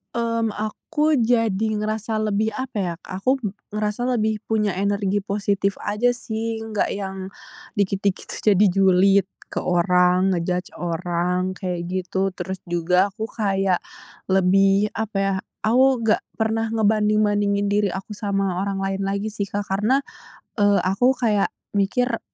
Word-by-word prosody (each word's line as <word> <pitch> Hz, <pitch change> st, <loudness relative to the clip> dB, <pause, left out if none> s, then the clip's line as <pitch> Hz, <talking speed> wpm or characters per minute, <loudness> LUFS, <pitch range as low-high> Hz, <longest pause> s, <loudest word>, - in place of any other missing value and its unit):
Mmm, 230 Hz, -1 st, 0 dB
aku 295 Hz, +8 st, 0 dB
jadi 225 Hz, -3 st, +2 dB
ngerasa 215 Hz, +1 st, -2 dB
lebih 215 Hz, +1 st, +1 dB
apa 260 Hz, -3 st, -5 dB
ya, 180 Hz, -3 st, -1 dB
aku 195 Hz, +8 st, 0 dB, 0.4 s
ngerasa 210 Hz, +3 st, -1 dB
lebih 215 Hz, -1 st, 0 dB
punya 210 Hz, -2 st, +1 dB
energi 200 Hz, 0 st, +1 dB
positif 200 Hz, 0 st, -1 dB
aja 235 Hz, +4 st, +1 dB
sih, 225 Hz, -1 st, -3 dB
enggak 220 Hz, -2 st, -1 dB
yang 190 Hz, -1 st, -5 dB, 0.5 s
dikit-dikit 200 Hz, -1 st, -1 dB
tuh, 210 Hz, -2 st, +2 dB
jadi 205 Hz, +3 st, +5 dB
julid 195 Hz, +1 st, +4 dB, 0.2 s
ke -, -, -2 dB
orang, 180 Hz, +1 st, +3 dB
nge-judge 180 Hz, 0 st, -1 dB
orang 175 Hz, +1 st, -1 dB
kayak 180 Hz, -2 st, -4 dB
gitu. 190 Hz, +1 st, -1 dB
Terus 190 Hz, 0 st, -6 dB
juga 180 Hz, +3 st, +1 dB
aku 220 Hz, +2 st, -5 dB
kayak 195 Hz, -4 st, 0 dB, 0.5 s
lebih 195 Hz, +2 st, +4 dB
apa 220 Hz, -2 st, -3 dB
ya 195 Hz, 0 st, +1 dB, 0.3 s
aku 255 Hz, +2 st, +4 dB
enggak 225 Hz, -2 st, +2 dB, 0.2 s
pernah 220 Hz, 0 st, 0 dB
ngebanding-bandingin 210 Hz, -2 st, +2 dB
diri 205 Hz, 0 st, +2 dB
aku 195 Hz, +3 st, -6 dB
sama 195 Hz, -3 st, -1 dB
orang 195 Hz, -1 st, -2 dB
lain 195 Hz, 0 st, -2 dB
lagi 200 Hz, +2 st, -1 dB
sih, 210 Hz, -1 st, -3 dB
Kak, 205 Hz, 0 st, -3 dB
karena, 210 Hz, +8 st, +2 dB, 0.6 s
eee, 205 Hz, 0 st, +5 dB
aku 245 Hz, +8 st, +2 dB
kayak 215 Hz, -5 st, +2 dB, 0.2 s
mikir, 230 Hz, +4 st, 0 dB
200 Hz, 135 wpm, -22 LUFS, 190-220 Hz, 0.6 s, jadi